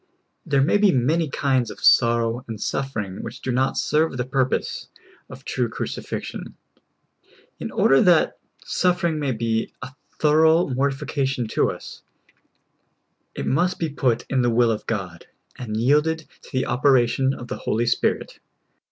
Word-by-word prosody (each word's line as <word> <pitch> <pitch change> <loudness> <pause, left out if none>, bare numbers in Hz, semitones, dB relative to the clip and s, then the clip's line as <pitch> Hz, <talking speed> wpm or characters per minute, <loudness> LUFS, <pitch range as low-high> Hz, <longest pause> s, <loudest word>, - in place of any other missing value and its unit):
There 140 -2 +3
may 170 +8 +3
be 205 -2 +5
many 150 +5 +1
kinds 130 -4 0
of - - -9
sorrow 115 0 +3
and 110 -2 -6
suffering 105 -8 -3
which 115 - -8
do 130 - -3
not 130 +2 0
serve 150 -2 +1
the 125 - -1
purpose 130 0 -1 0.4
of - - -12
true - - -1
crucifixion. - - -6 1.0
In - - -4
order 135 0 +4
that 175 -3 +3 0.3
suffering 175 -3 0
may 140 -3 -1
be 115 -1 -1
a 125 +1 -9 0.2
thorough 160 +2 +4
mortifi 135 +1 -1
cation 135 -4 -1
to - - +1
us, - - -8 1.3
it - - -4
must 175 +6 +1
be 165 - -2
put 130 -5 0
in 130 -2 +1
the 120 - +2
will 120 0 +3
of 110 -1 -4
God, 95 -6 -4 0.3
and 110 -3 -5
yielded 150 +6 +1
to - - -16
the 130 - 0
operation 130 +1 +2
of 120 - -9
the - - -5
Holy 115 +2 -1
Spirit. 120 - -1
130 Hz, 150 wpm, -23 LUFS, 120-150 Hz, 1.3 s, be